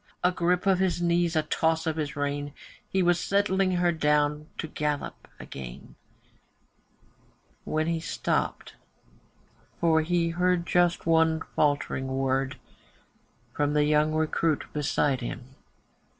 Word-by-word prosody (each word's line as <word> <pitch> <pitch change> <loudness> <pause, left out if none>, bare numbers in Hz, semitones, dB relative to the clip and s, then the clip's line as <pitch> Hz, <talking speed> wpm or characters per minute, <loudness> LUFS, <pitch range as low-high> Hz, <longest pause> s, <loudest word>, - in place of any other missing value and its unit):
A 180 - +4
grip 180 0 0
of 190 -2 +3
his 185 -2 +1
knees, 170 -1 +1
a 155 - +2
toss 160 +1 0
of 160 -2 -1
his 150 -2 -3
rein, 145 0 -3 0.4
He 190 -1 +1
was 175 0 +3
settling 195 -1 +1
her 175 -1 +2
down 150 -1 +1
to - - -3
her 155 - -12
gallop 150 -1 -3
again, 60 -2 -9 1.7
When 155 0 0
he 165 0 -1
stopped, 160 - -2 1.1
for 160 -1 +3
he 170 +1 +1
heard 180 0 +1
just 175 0 +2
one 160 -1 +3
faltering 145 -3 +1
word 135 0 -1 1.0
From 145 0 0
the 150 0 +3
young 150 +1 +3
recruit 155 0 +1
beside 145 -2 0
him. 120 +2 -7
160 Hz, 130 wpm, -27 LUFS, 145-175 Hz, 1.7 s, A